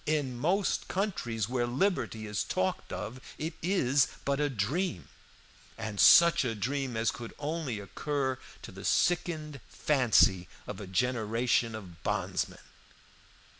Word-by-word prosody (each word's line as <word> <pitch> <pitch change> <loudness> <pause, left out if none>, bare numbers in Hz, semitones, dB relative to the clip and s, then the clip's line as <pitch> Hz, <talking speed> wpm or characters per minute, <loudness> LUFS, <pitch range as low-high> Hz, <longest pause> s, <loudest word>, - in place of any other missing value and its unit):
In 145 -5 0
most 175 +10 0
countries 120 - -2
where 120 -1 0
liberty 125 - 0
is 105 -1 -2
talked 95 - -2
of 125 +3 -5 0.2
it 160 +2 -3
is 145 -7 +3 0.2
but 140 0 0
a 145 0 +1
dream, 120 - -2 0.7
and 110 -2 -5
such 170 -3 +7
a 115 -3 -1
dream 130 +2 -2
as 115 +1 +2
could 115 -1 -9
only 150 -6 -3
occur 130 +5 -2 0.2
to - - -8
the - - -10
sickened 160 -4 0
fancy 115 -10 +3 0.2
of - - -7
a 100 - -7
generation 115 +3 +1
of 90 -6 -10
bondsmen. - - -2
125 Hz, 130 wpm, -30 LUFS, 110-150 Hz, 0.7 s, such